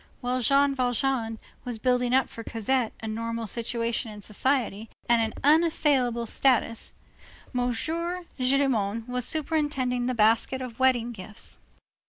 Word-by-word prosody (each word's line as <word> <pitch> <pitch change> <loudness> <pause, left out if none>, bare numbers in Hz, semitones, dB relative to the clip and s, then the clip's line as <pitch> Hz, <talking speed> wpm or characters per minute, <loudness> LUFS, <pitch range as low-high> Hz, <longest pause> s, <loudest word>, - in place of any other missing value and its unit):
While 250 0 -1
Jean 275 +3 +4
Valjean 245 -2 0 0.3
was 245 -3 -4
building 250 +1 +1
up 265 0 +3
for 230 - -9
Cosette 230 +2 0
a - - -3
normal 230 +1 -3
situation 230 +1 -2
in 210 -1 -10
society 225 -1 -1 0.2
and 235 -1 +4
an 220 -1 0
unassailable 285 -6 +3
status, 230 -1 +1 0.6
M. 245 0 +1
Gillenormand 270 - -1
was 250 -1 -2
superintending 290 -6 0
the 255 - -1
basket 225 +4 +3
of 250 -2 -7
wedding 245 -2 +3
gifts. 210 -1 -7
245 Hz, 130 wpm, -27 LUFS, 230-265 Hz, 0.6 s, Jean